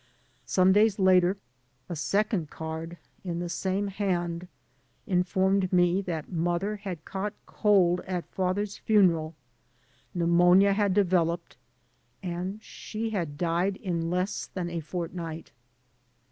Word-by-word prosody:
Some 185 0 +4
days 210 0 +4
later 185 -1 +4 0.5
a 175 - -4
second 200 +1 0
card 160 +1 -6 0.3
in 175 -3 -3
the 175 0 -3
same 190 +3 -1
hand 180 -3 -2 0.6
informed 190 0 +1
me 180 +1 +3
that 165 -5 -5
mother 175 +4 -1
had 190 -6 -7
caught 200 +2 -4
cold 185 -4 +3
at 180 -2 -2
father's 195 +2 -2
funeral, 170 -7 +3 0.8
pneumonia 175 +3 +5
had 200 -2 +1
developed, 175 -4 +1 0.7
and 180 +3 -4
she 225 +1 -5
had 165 -8 -3
died 175 +4 0
in 170 -3 -2
less 180 +3 -1
than 175 -2 -4
a 170 - -2
fort 170 +2 -5
night. 165 -2 -6
180 Hz, 120 wpm, -28 LUFS, 170-195 Hz, 0.8 s, pneumonia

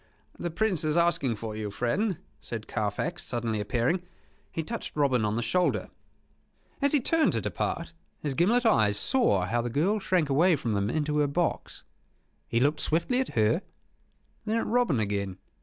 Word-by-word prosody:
"The 175 - -2
Prince 185 -1 0
is 155 +1 +1
asking 170 -8 +2
for 110 0 -6
you, 105 -1 -3
friend," 155 - 0 0.2
said 110 +1 -6
Carfax, 110 - -2
suddenly 115 -3 -2
appearing. 120 - 0 0.5
He 165 - -3
touched 230 +8 -5
Robin 135 -6 +2
on 105 0 0
the 120 - -1
shoulder. 180 +7 +1 0.9
As 280 +1 +2
he 295 - +5
turned 320 +5 +2
to - - 0
depart, 170 0 -3 0.3
his 145 -2 -2
gimlet 225 - +2
eyes 110 - +4
saw 235 - +2
how 120 +6 0
the 120 - -3
girl 175 - +1
shrank 185 -5 +1
away 160 +6 +4
from 115 -6 -2
them 100 0 0
into 150 +2 0
her 145 - +3
box. 170 +5 -2 0.6
He 115 - +1
looked 145 +4 +2
swiftly 170 +11 +1
at 265 - -3
her; 110 - +3 0.8
then 220 +1 0
at - - 0
Robin 235 - +2
again. 100 -3 -2
150 Hz, 175 wpm, -28 LUFS, 115-185 Hz, 0.9 s, he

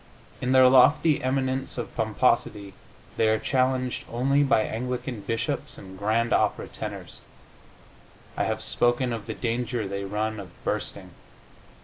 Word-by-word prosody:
In 125 - 0
their 130 -1 +7
lofty 145 +4 +5
eminence 130 0 -1
of 120 - -5
pomposity 110 -3 0 0.4
they 110 - +3
are 110 0 +3
challenged 130 0 0
only 135 +4 +2
by 135 -6 +3
Anglican 125 0 -4
bishops 115 +3 -3
and 95 -1 -11
grand 110 +4 0
opera - - +1
tenors. - - -7 1.1
I - - 0
have 110 0 -2
spoken 120 0 +1
of 115 -3 -6
the - - -4
danger 120 -2 -2
they 100 0 -4
run 110 +2 -2
of 95 -3 -8
bursting. - - -4
120 Hz, 135 wpm, -26 LUFS, 110-130 Hz, 1.1 s, their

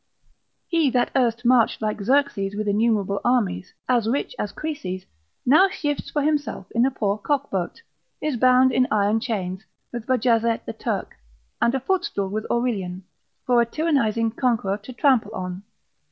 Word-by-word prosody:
He 330 -4 +2
that 245 -1 +1
erst 245 -2 +1
marched 240 -2 +4
like 215 -1 -2
Xerxes 205 -5 +1
with 210 0 -3
innumerable 205 -2 +1
armies, 210 - 0
as 240 -3 +2
rich 280 - -1
as - - -2
Croesus, 190 -13 -5 0.4
now 335 +10 +6
shifts 290 -5 -3
for 295 - -1
himself 290 -10 -1
in 235 +3 +3
a - - +2
poor 210 -5 -1
cock 280 +4 -1
boat, 190 - -3 0.4
is 305 -3 -1
bound 255 +2 +5
in 255 0 +2
iron 210 +1 +2
chains, 195 -5 -3 0.3
with 240 -1 -6
Bajazet 230 -2 +2
the - - -5
Turk, - - -4 0.4
and 235 - +3
a - - +1
footstool 265 - -1
with 215 +2 -4
Aurelian, 195 -7 -1 0.4
for 245 -1 +4
a - - +2
tyrannising 230 -7 +1
conqueror 225 -6 0
to 215 +5 -11
trample 255 -1 +2
on. 180 0 -5
235 Hz, 160 wpm, -23 LUFS, 205-260 Hz, 0.4 s, now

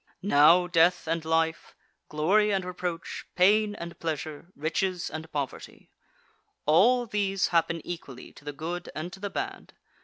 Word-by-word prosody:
Now 170 0 +6
death 175 +1 +3
and 165 0 -1
life, 160 0 0 0.3
glory 195 +8 +2
and 190 -2 0
reproach, 180 -1 -5
pain 205 +3 +4
and 170 -2 -8
pleasure, 155 -1 -4
riches 175 +4 -2
and 155 +1 -7
poverty 140 -3 -6 0.7
all 240 +11 +4
these 200 -3 0
happen 165 -1 +1
equally 150 -7 -8
to - - -16
the 145 - -5
good 170 +5 -5
and 165 +4 -5
to - - -10
the 205 +1 -4
bad. 390 - -5
170 Hz, 145 wpm, -27 LUFS, 160-195 Hz, 0.7 s, Now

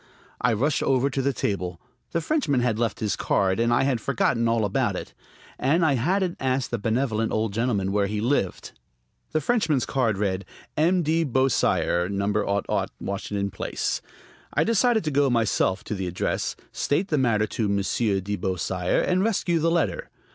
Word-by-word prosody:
I 125 - +3
rushed 135 +7 +1
over 135 +1 +2
to 135 - -1
the 140 +1 +1
table. 90 -7 -3 0.3
The 170 - -1
Frenchman 155 - +1
had 115 -3 0
left 115 -2 -1
his 105 -3 0
card, 95 +1 +1
and 115 0 +2
I 120 - +3
had 130 -4 0
forgotten 115 -2 +1
all 115 -1 +2
about 100 - 0
it. - - -6 0.5
And 160 +6 +3
I 150 - +3
hadn't 175 +8 0
asked 130 -1 -1
the 120 - -1
benevolent 115 0 0
old 110 -2 -1
gentleman 105 -4 0
where 100 0 +1
he 105 +1 -2
lived. 115 -5 -1 0.6
The 155 - +1
Frenchman's 160 - +1
card 115 -6 0
read: 95 -2 -1 0.3
"M. 175 +3 +3
de 160 +2 +2
Beausire, 130 - +1
No. 100 0 0 0.4
Washington 100 0 -3
Place." - - -2 0.5
I - - +4
decided 230 0 +2
to 155 - -1
go 140 0 +3
myself 110 -4 +1
to - - -4
the 95 -3 -3
address, 90 +1 -2 0.2
state 175 +8 0
the 150 - +2
matter 110 -5 +2
to 110 0 -2
Monsieur 100 +1 +1
de 100 +2 -3
Beausire, 90 -1 -1
and 185 +1 +2
rescue 185 -6 +1
the 165 +2 +2
letter. 160 - 0
115 Hz, 175 wpm, -25 LUFS, 100-145 Hz, 0.6 s, I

